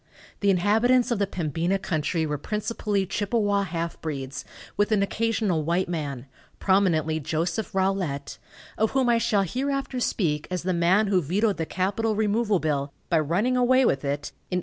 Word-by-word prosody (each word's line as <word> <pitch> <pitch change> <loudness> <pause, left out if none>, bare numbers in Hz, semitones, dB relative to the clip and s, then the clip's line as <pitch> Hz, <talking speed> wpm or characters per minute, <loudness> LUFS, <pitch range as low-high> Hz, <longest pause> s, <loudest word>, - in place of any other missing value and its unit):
The 200 - +2
inhabitants 225 +7 +3
of 230 - 0
the 200 - +1
Pembina 170 +1 -1
country 160 -3 -1
were 150 -2 -2
principally 210 +1 -2
Chippewa 205 +1 0
half 170 -2 -4
breeds, 140 -3 -5 0.3
with 205 +2 +1
an 205 -2 +3
occasional 215 -5 0
white 170 +4 0
man, 145 -7 -4 0.3
prominently 165 -5 +2
Joseph 165 +8 -2
Rolette, 185 -8 -1 0.4
of 220 0 +3
whom 260 -2 +3
I 235 -1 +4
shall 215 -3 +2
hereafter 270 +5 -2
speak 155 -11 0
as 180 -1 -3
the 185 +1 0
man 175 +5 +3
who 195 -3 +2
vetoed 195 +7 0
the 160 -1 -2
capital 205 +4 -1
removal 215 0 +1
bill, 145 -4 -1 0.2
by 165 - +4
running 185 - +1
away 255 +1 +4
with 140 - +2
it, 140 +1 -3 0.2
in 180 - 0
1857. - - +2
190 Hz, 170 wpm, -25 LUFS, 160-215 Hz, 0.4 s, I